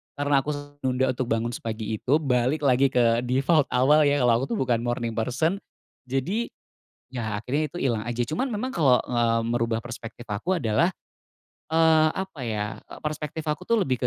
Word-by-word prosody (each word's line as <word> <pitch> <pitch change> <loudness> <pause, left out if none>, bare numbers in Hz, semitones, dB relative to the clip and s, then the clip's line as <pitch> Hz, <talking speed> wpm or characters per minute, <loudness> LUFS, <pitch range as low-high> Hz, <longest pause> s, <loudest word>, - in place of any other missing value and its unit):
karena 145 -1 +2
aku 150 +2 -2
su 145 0 -10
menunda 130 0 +1
untuk 130 -1 -3
bangun 115 +1 0
sepagi 110 -2 -4
itu 145 +5 +2
balik 130 +3 +1
lagi 135 0 +4
ke 120 -2 +3
default 135 +5 +2
awal 135 +5 +4
ya, 145 - +3
kalau 120 - +5
aku 135 - -1
tuh - - -2
bukan 120 -3 +1
morning 120 -1 -2
person. 130 - 0 0.5
Jadi, 175 - -1 0.6
ya 110 -5 -3
akhirnya 145 +5 -2
itu 175 - -6
hilang 115 -5 0
aja, 120 0 -3
cuman 240 - -1
memang 215 +5 -2
kalau, 140 - +3
eee, 115 -2 +2
merubah 115 -1 0
perspektif 120 -1 -9
aku 165 - -1
adalah, 115 - +2 0.7
eee, 160 0 +4
apa 190 -6 -5
ya, 105 -2 -1 0.2
eee, - - -11
perspektif 150 +1 -4
aku 170 +4 -4
tuh 230 -3 +3
lebih 130 -3 0
130 Hz, 180 wpm, -25 LUFS, 120-155 Hz, 0.7 s, kalau